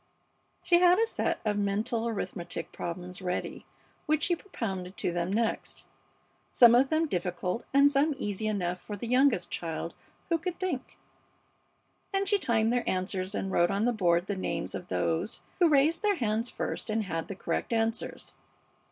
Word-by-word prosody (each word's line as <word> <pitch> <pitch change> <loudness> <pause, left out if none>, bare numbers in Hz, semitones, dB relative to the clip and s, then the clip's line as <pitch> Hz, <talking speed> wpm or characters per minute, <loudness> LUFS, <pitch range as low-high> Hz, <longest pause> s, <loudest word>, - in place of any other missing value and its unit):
She 345 -1 +5
had 360 0 +6
a 455 - +4
set - - -1
of 210 -1 +1
mental 215 +3 0
arithmetic 175 -6 -4
problems 180 +2 -6
ready 180 -1 -4 0.4
which 310 0 +2
she 350 - +3
propounded 195 - -5
to - - -1
them 175 +1 -1
next, 225 +2 -1 0.7
some 235 -2 +7
of 260 +3 +5
them 320 +1 +2
difficult 180 - -2
and 280 +1 +6
some 285 +2 +2
easy 210 -3 -3
enough 180 -4 -1
for 210 - -6
the 220 - -5
youngest 245 -7 +3
child 165 0 -4 0.4
who 335 -1 +2
could 350 +1 -4
think, 355 -9 -3 1.1
and 390 0 0
she 405 +1 +3
timed 230 - +2
their 245 - 0
answers 185 +1 -2
and 195 - -2
wrote 175 -1 +3
on 200 +3 +1
the 245 - +2
board 175 -4 +2
the 200 - -2
names 170 -3 -3
of 180 - -6
those 165 +7 -1 0.2
who 345 -2 +5
raised 305 +3 +3
their 415 -2 +2
hands 225 -4 -1
first - - -4
and 215 0 0
had 165 -4 -3
the 200 - -5
correct 200 - -3
answers. 225 0 -2
220 Hz, 170 wpm, -29 LUFS, 180-275 Hz, 1.1 s, some